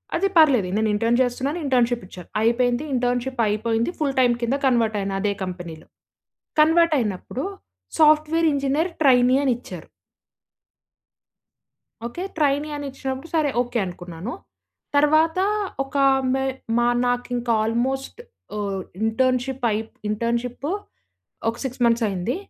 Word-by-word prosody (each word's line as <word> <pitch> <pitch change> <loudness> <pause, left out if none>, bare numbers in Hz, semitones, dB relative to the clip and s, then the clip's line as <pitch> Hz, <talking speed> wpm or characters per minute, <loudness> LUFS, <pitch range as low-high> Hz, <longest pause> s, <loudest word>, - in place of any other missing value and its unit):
అది 390 +3 +2
పర్లేదు 265 - +5
నేను 220 0 +1
ఇంటర్న్ 230 +3 +2
చేస్తున్నాను 260 +6 -1
ఇంటర్న్‌షిప్‌ 245 -4 +1
ఇచ్చారు 180 -2 -12
అయిపోయింది 245 +3 +2
ఇంటర్న్‌షీ‌ప్‌ 245 0 -1
అయిపోయింది 225 +6 0
ఫుల్ 280 -3 0
టైమ్ 245 -2 +4
కింద 240 +4 +1
కన్వర్ట్ 230 -4 +2
అయినా 195 0 -2
అదే 205 -1 +1
కంపెనీలో. 175 -3 -7 0.7
కన్వర్ట్ 325 +1 +5
అయినప్పుడు 220 +5 -3 0.6
software 310 +1 +4
engineer 280 +5 0
trainee 255 -2 +5
అనిచ్చారు. 250 -2 -3 2.2
Okay. 345 +10 -5
Trainee 290 0 +1
అనిచ్చినప్పుడు 270 +1 -5
సరే 305 -3 +2
ఓకే. 245 -1 -3
అనుకున్నాను. 175 +3 -7 0.6
తర్వాత 310 +4 +4 0.4
ఒక 270 +1 -6 0.4
మే 265 0 0 0.3
మా 240 0 +3 0.2
నాకింకా 245 -1 -1
ఆల్‌మోస్ట్ 265 - -2 0.4
ఆహ్, 200 -2 -2 0.2
ఇంటర్న్‌షిప్‌ 255 +2 0
అయి‌ప్ 220 +1 -3 0.2
ఇంటర్న్‌షిప్‌ 235 +4 -2 0.8
ఒక 230 - -1
6 255 -1 -4
మంత్స్ 230 0 +3
అయింది. 195 +6 -2
245 Hz, 115 wpm, -23 LUFS, 225-275 Hz, 2.2 s, పర్లేదు